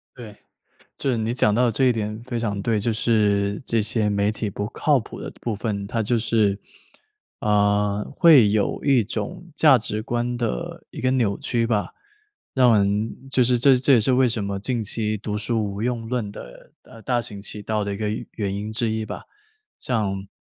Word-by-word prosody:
对， 110 Hz, -4 st, -10 dB, 0.6 s
就 135 Hz, -, -1 dB
是 125 Hz, -, +1 dB
你 110 Hz, +1 st, -1 dB
讲 105 Hz, -4 st, +2 dB
到 125 Hz, +3 st, +3 dB
的 120 Hz, -, +1 dB
这 130 Hz, +5 st, +1 dB
一 125 Hz, -, +5 dB
点 110 Hz, 0 st, -4 dB
非 125 Hz, -2 st, -3 dB
常 105 Hz, -3 st, -2 dB
对。 110 Hz, +1 st, 0 dB
就 115 Hz, +2 st, 0 dB
是 105 Hz, -3 st, +1 dB
这 115 Hz, -1 st, +1 dB
些 105 Hz, 0 st, 0 dB
媒 100 Hz, 0 st, +1 dB
体 110 Hz, -1 st, -3 dB
不 100 Hz, +2 st, -4 dB
靠 145 Hz, +2 st, +2 dB
谱 110 Hz, -, -10 dB
的 -, -, -6 dB
部 115 Hz, -, -2 dB
分， 100 Hz, -2 st, -3 dB
它 115 Hz, +2 st, -1 dB
就 115 Hz, +2 st, +1 dB
是， 110 Hz, -3 st, +1 dB, 0.8 s
呃， 105 Hz, 0 st, +2 dB
会 145 Hz, -, +7 dB
有 105 Hz, -1 st, 0 dB
一 135 Hz, -5 st, +4 dB
种 110 Hz, -, -6 dB
价 145 Hz, -5 st, +6 dB
值 105 Hz, 0 st, -4 dB
观 120 Hz, 0 st, -2 dB
的 115 Hz, -, -4 dB
一 -, -, -8 dB
个 130 Hz, -, +1 dB
扭 115 Hz, -6 st, +1 dB
曲 115 Hz, -2 st, -1 dB
吧。 105 Hz, -3 st, -1 dB, 0.6 s
让 125 Hz, -4 st, +5 dB
人 105 Hz, +6 st, -1 dB
就 130 Hz, -2 st, +3 dB
是 125 Hz, 0 st, +3 dB
这 135 Hz, +1 st, +5 dB
这 135 Hz, +2 st, +3 dB
也 120 Hz, -, +5 dB
是 125 Hz, +5 st, +2 dB
为 130 Hz, 0 st, +4 dB
什 110 Hz, -2 st, -2 dB
么 100 Hz, 0 st, -3 dB
近 120 Hz, +3 st, -2 dB
期 110 Hz, +1 st, -2 dB
读 105 Hz, 0 st, -4 dB
书 110 Hz, +1 st, -1 dB
无 100 Hz, 0 st, -5 dB
用 115 Hz, -1 st, -2 dB
论 120 Hz, -5 st, -2 dB
的 -, -, -12 dB
呃， 115 Hz, -, -15 dB
大 120 Hz, -2 st, 0 dB
行 100 Hz, -3 st, -9 dB
其 105 Hz, +1 st, -6 dB
道 105 Hz, 0 st, -1 dB
的 100 Hz, -, -3 dB
一 -, -, -5 dB
个 105 Hz, 0 st, -2 dB, 0.2 s
原 100 Hz, -3 st, -3 dB
因 105 Hz, +2 st, -4 dB
之 110 Hz, 0 st, -1 dB
一 110 Hz, 0 st, -2 dB
吧。 -, -, -7 dB, 0.6 s
像 100 Hz, -5 st, -2 dB
110 Hz, 220 characters per minute, -23 LUFS, 105-120 Hz, 0.8 s, 会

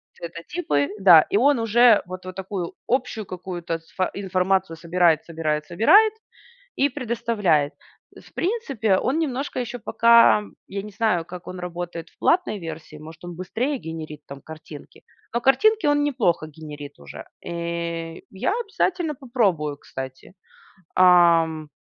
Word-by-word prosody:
цветотипы. 170 Hz, -, -2 dB
Да, 180 Hz, -5 st, +8 dB
и 200 Hz, -, +2 dB
он 275 Hz, +2 st, +4 dB
уже 230 Hz, 0 st, +5 dB
вот 185 Hz, +1 st, -8 dB
вот 185 Hz, 0 st, -7 dB
такую 190 Hz, -2 st, -5 dB
общую 245 Hz, -4 st, -1 dB
какую-то 175 Hz, -2 st, -5 dB
сво 180 Hz, +3 st, -3 dB
информацию 190 Hz, -2 st, 0 dB
собирает, 170 Hz, -1 st, +2 dB
собирает, 155 Hz, -2 st, -2 dB
собирает 395 Hz, -, +5 dB, 0.7 s
и 280 Hz, -, +3 dB
предоставляет. 225 Hz, -, 0 dB, 0.6 s
В -, -, -28 dB
принципе, 275 Hz, -, 0 dB
он 270 Hz, +9 st, 0 dB
немножко 280 Hz, -4 st, -2 dB
ещё 245 Hz, 0 st, -5 dB
пока 230 Hz, -2 st, +5 dB, 0.2 s
я 195 Hz, 0 st, -4 dB
не 210 Hz, -, -9 dB
знаю, 200 Hz, -5 st, 0 dB
как 175 Hz, +1 st, -10 dB
он 185 Hz, -, -7 dB
работает 175 Hz, -1 st, -6 dB
в -, -, -35 dB
платной 340 Hz, -, +1 dB
версии, 155 Hz, -1 st, -10 dB
может, 160 Hz, +2 st, -12 dB
он 175 Hz, -1 st, -7 dB
быстрее 245 Hz, -, -2 dB
генерит 155 Hz, -2 st, -7 dB
там 140 Hz, 0 st, -10 dB
картинки. 155 Hz, -1 st, -12 dB, 0.3 s
Но 235 Hz, -, +1 dB
картинки 300 Hz, -, +3 dB
он 290 Hz, 0 st, +3 dB
неплохо 230 Hz, -, 0 dB
генерит 150 Hz, -2 st, -9 dB
уже. 70 Hz, -1 st, -10 dB, 0.2 s
Э, 170 Hz, -1 st, -4 dB, 0.2 s
я 190 Hz, -, -1 dB
обязательно 370 Hz, -7 st, -1 dB
попробую, 200 Hz, -, 0 dB
кстати. 130 Hz, +3 st, -9 dB, 0.6 s
Ам. 170 Hz, -4 st, +4 dB
185 Hz, 135 wpm, -23 LUFS, 165-235 Hz, 0.7 s, Да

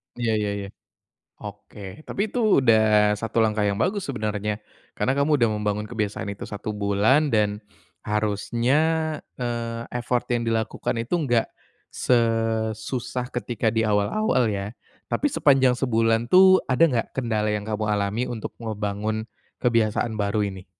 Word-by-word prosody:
Iya 120 Hz, -2 st, -1 dB
iya 105 Hz, -1 st, -1 dB
iya. 100 Hz, -, -6 dB, 0.7 s
Oke. 100 Hz, +6 st, -10 dB
Tapi -, -, -4 dB
itu 220 Hz, -, +3 dB
udah 110 Hz, -3 st, +4 dB
satu 115 Hz, +2 st, -3 dB
langkah 110 Hz, -1 st, +1 dB
yang 100 Hz, -1 st, +1 dB
bagus 195 Hz, -, 0 dB
sebenarnya 105 Hz, -4 st, -2 dB, 0.4 s
karena 130 Hz, -, +1 dB
kamu 145 Hz, +2 st, +3 dB
udah 115 Hz, -, +4 dB
membangun 105 Hz, 0 st, -2 dB
kebiasaan 105 Hz, -3 st, -3 dB
itu 100 Hz, -, -8 dB
1 105 Hz, +1 st, -5 dB
bulan 105 Hz, +9 st, +2 dB
dan 105 Hz, -1 st, +1 dB, 0.4 s
harusnya, 110 Hz, +6 st, 0 dB, 0.6 s
eee, 115 Hz, -1 st, -3 dB
effort 125 Hz, 0 st, -1 dB
yang 120 Hz, -1 st, +1 dB
dilakukan 115 Hz, +1 st, -1 dB
itu 115 Hz, +8 st, -3 dB
enggak 120 Hz, -8 st, +1 dB, 0.5 s
sesusah 115 Hz, +1 st, 0 dB
ketika 120 Hz, -2 st, -1 dB
di 110 Hz, 0 st, +1 dB
awal-awal 110 Hz, -, +1 dB
ya. 100 Hz, 0 st, -3 dB, 0.3 s
Tapi -, -, 0 dB
sepanjang 130 Hz, -, +4 dB
sebulan 115 Hz, -2 st, +1 dB
tuh 185 Hz, 0 st, +7 dB
ada 130 Hz, +3 st, +1 dB
nggak 120 Hz, -5 st, -1 dB
kendala 110 Hz, -4 st, 0 dB
yang 105 Hz, -1 st, -2 dB
kamu 110 Hz, 0 st, -2 dB
alami 105 Hz, +2 st, 0 dB
untuk 115 Hz, -3 st, -5 dB
ngebangun 110 Hz, -1 st, -3 dB, 0.4 s
kebiasaan 115 Hz, -1 st, +1 dB
baru 100 Hz, +1 st, 0 dB
ini? 95 Hz, -2 st, -6 dB
110 Hz, 140 wpm, -24 LUFS, 105-125 Hz, 0.7 s, tuh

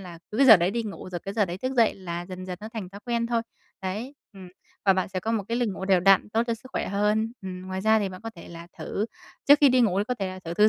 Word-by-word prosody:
là 175 Hz, -3 st, -10 dB
cứ 215 Hz, -, -5 dB
cái 275 Hz, -, +6 dB
giờ 220 Hz, -4 st, +11 dB
đấy 175 Hz, +2 st, +1 dB
đi 235 Hz, +1 st, -1 dB
ngủ, 205 Hz, -3 st, -7 dB
rồi 175 Hz, -, -3 dB
cái 195 Hz, +1 st, -6 dB
giờ 210 Hz, -3 st, +3 dB
đấy 175 Hz, +1 st, -6 dB
thức 255 Hz, +4 st, -2 dB
dậy 230 Hz, -2 st, +4 dB
là 175 Hz, -2 st, -6 dB
dần 185 Hz, 0 st, -7 dB
dần 180 Hz, -1 st, -5 dB
nó 215 Hz, -, -7 dB
thành 215 Hz, -5 st, -5 dB
thói 200 Hz, +2 st, -11 dB
quen 235 Hz, -1 st, 0 dB
thôi. 235 Hz, -1 st, 0 dB, 0.4 s
Đấy, 215 Hz, +9 st, -4 dB, 0.2 s
ừm, 190 Hz, -2 st, -11 dB, 0.4 s
và 195 Hz, -, +6 dB
bạn 185 Hz, -1 st, -1 dB
sẽ 185 Hz, -1 st, -4 dB
có 225 Hz, +4 st, -2 dB
một 220 Hz, -, 0 dB
cái 230 Hz, -, 0 dB
lịch 240 Hz, -3 st, +1 dB
ngủ 190 Hz, -1 st, -5 dB
đều 190 Hz, -2 st, +4 dB
đặn, 195 Hz, +2 st, +5 dB
tốt 225 Hz, +2 st, +1 dB
cho 230 Hz, -, 0 dB
sức 230 Hz, +3 st, -14 dB
khỏe -, -, -2 dB
hơn. 210 Hz, +3 st, +1 dB
Ừm, 185 Hz, -1 st, -6 dB
ngoài 190 Hz, 0 st, -4 dB
ra 220 Hz, +1 st, +4 dB
thì 200 Hz, -2 st, -1 dB
bạn 185 Hz, 0 st, -9 dB
có 225 Hz, -, -5 dB
thể 170 Hz, -, -11 dB
là 170 Hz, 0 st, -10 dB
thử 210 Hz, +3 st, -2 dB, 0.4 s
trước 290 Hz, +1 st, +9 dB
khi 285 Hz, -, +7 dB
đi 255 Hz, 0 st, +4 dB
ngủ 195 Hz, -5 st, +3 dB
thì 205 Hz, -, +1 dB
có 250 Hz, -, 0 dB
thể 195 Hz, -, -1 dB
là 185 Hz, 0 st, -7 dB
thử 165 Hz, -, -4 dB
thư 210 Hz, +4 st, +6 dB
200 Hz, 320 wpm, -26 LUFS, 185-225 Hz, 0.4 s, giờ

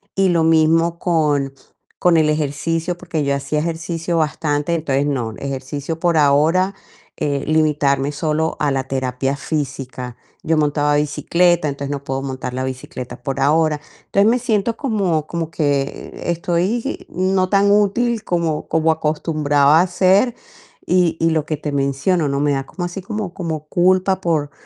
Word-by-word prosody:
y 195 Hz, 0 st, +3 dB
lo 170 Hz, -2 st, +2 dB
mismo 165 Hz, +1 st, +3 dB
con, 150 Hz, -5 st, +1 dB, 0.5 s
con 180 Hz, -1 st, +4 dB
el 155 Hz, -1 st, +3 dB
ejercicio, 160 Hz, +3 st, -1 dB
porque 175 Hz, -4 st, -3 dB
yo 140 Hz, 0 st, +1 dB
hacía 140 Hz, +2 st, -2 dB
ejercicio 165 Hz, +1 st, -2 dB
bastante, 150 Hz, 0 st, 0 dB
entonces 145 Hz, -4 st, 0 dB
no, 125 Hz, -6 st, -2 dB
ejercicio 140 Hz, +3 st, -5 dB
por 170 Hz, -1 st, +2 dB
ahora, 155 Hz, +6 st, +3 dB, 0.4 s
eh, 145 Hz, -2 st, -1 dB
limitarme 145 Hz, -3 st, +2 dB
solo 155 Hz, +2 st, -1 dB
a 145 Hz, -1 st, +1 dB
la 135 Hz, -1 st, 0 dB
terapia 135 Hz, +1 st, -1 dB
física, 135 Hz, -4 st, -4 dB, 0.3 s
yo 160 Hz, 0 st, +1 dB
montaba 145 Hz, -1 st, +2 dB
bicicleta, 170 Hz, +3 st, +2 dB
entonces 140 Hz, -1 st, -4 dB
no 140 Hz, -1 st, -4 dB
puedo 135 Hz, -1 st, -3 dB
montar 130 Hz, -2 st, -5 dB
la 130 Hz, +1 st, -2 dB
bicicleta 130 Hz, -1 st, -6 dB
por 135 Hz, +1 st, -3 dB
ahora, 150 Hz, +2 st, +2 dB, 0.3 s
entonces, 200 Hz, +2 st, +3 dB
me 245 Hz, +2 st, +2 dB
siento 230 Hz, -2 st, 0 dB
como, 195 Hz, -, 0 dB
como 165 Hz, -2 st, -3 dB
que 145 Hz, -4 st, -1 dB
estoy 175 Hz, +6 st, -1 dB
no 185 Hz, 0 st, +1 dB
tan 200 Hz, 0 st, +4 dB
útil 215 Hz, +3 st, +2 dB
como, 170 Hz, -5 st, -1 dB
como 160 Hz, 0 st, +2 dB
acostumbraba 150 Hz, -1 st, +2 dB
a 185 Hz, -, +1 dB
ser 190 Hz, +6 st, +3 dB, 0.5 s
y 180 Hz, -2 st, +3 dB
y 165 Hz, 0 st, +2 dB
lo 155 Hz, -2 st, 0 dB
que 155 Hz, -, -2 dB
te 150 Hz, 0 st, -4 dB
menciono, 140 Hz, +5 st, +1 dB
¿no?, 140 Hz, 0 st, -1 dB
me 145 Hz, 0 st, +2 dB
da 135 Hz, -1 st, -2 dB
como 175 Hz, +5 st, -5 dB
así 175 Hz, +2 st, -5 dB
como, 210 Hz, -2 st, -4 dB
como 160 Hz, -4 st, -4 dB
culpa 185 Hz, +3 st, +2 dB
por 155 Hz, -5 st, 0 dB
155 Hz, 160 wpm, -19 LUFS, 140-175 Hz, 0.5 s, con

